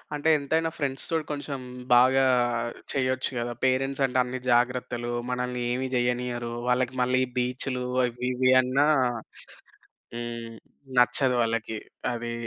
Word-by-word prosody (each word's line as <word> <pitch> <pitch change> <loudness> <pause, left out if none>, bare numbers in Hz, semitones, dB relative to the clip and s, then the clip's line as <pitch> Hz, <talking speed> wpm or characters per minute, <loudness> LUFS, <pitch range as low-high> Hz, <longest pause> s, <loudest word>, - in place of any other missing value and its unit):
అంటే 150 +2 +1
ఎంతైనా 160 +3 0
ఫ్రెండ్స్‌తోటి 145 +3 -2
కొంచెం 145 -1 -4 0.4
బాగా 130 +2 +5 0.7
చెయ్యొచ్చు 130 -1 0
గదా. 120 0 -2
పేరెంట్స్ 135 +1 +1
అంటే 130 -1 -2
అన్ని 125 +1 -5
జాగ్రత్తలు 120 0 +1 0.2
మనల్నేమి 125 0 -2
జెయ్యనియ్యరు. 120 -1 -1
వాళ్ళకి 125 +1 +1
మళ్ళీ 130 +1 +2 0.2
బీచ్‌లు 125 +1 -1 0.2
అవి 120 0 -6
ఇవి 130 +1 +3
అన్నా 130 +3 +2 1.3
హ్మ్, 120 -1 -5 0.5
నచ్చదు 125 +1 +4
వాళ్ళకి. 115 -1 -1 0.4
అది 120 0 -4
125 Hz, 110 wpm, -26 LUFS, 120-130 Hz, 1.3 s, బాగా